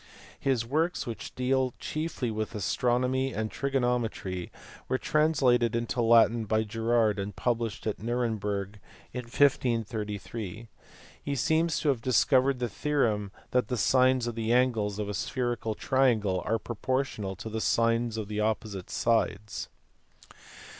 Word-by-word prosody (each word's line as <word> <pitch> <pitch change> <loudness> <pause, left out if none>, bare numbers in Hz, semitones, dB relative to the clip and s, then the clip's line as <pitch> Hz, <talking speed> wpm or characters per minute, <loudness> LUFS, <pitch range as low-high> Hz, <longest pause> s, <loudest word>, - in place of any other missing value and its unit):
His 130 -4 +1
works, 160 +8 0
which 115 -2 -7
deal 130 0 +1
chiefly 155 -6 -3
with 110 +1 -3
astro 105 +6 +1
nomy 130 +1 0
and 110 -1 -2
trigonometry, 120 -8 -1 0.4
were 130 - +2
translated 130 -7 +2
into 120 +1 -1
Latin 115 0 +5
by 110 +1 +1
Gerard 110 -1 +1
and 100 +1 -4
published 115 -3 -1
at 105 -2 -2
Nuremberg 105 -4 -2 0.3
in 125 -1 -4
1533. 115 -4 -1 0.5
He 140 - -2
seems 160 +5 +1
to 150 - +1
have 130 -5 +1
dis 125 -1 +3
covered 135 0 +3
the 125 -1 -1
theorem 110 -7 0 0.2
that 125 -4 +2
the 125 - -2
sines 130 +1 +3
of 120 - -2
the 115 0 -2
angles 115 -5 +2
of 105 -1 -2
a 105 - -3
spherical 120 +1 -2
triangle 110 -9 +2
are 115 - +2
proportional 120 -3 -2
to 110 +4 -8
the 110 0 -3
sines 115 0 +1
of 110 -2 -3
the 105 0 -3
opposite 105 -3 -2
sides. 110 -2 0
115 Hz, 140 wpm, -28 LUFS, 110-130 Hz, 0.5 s, Latin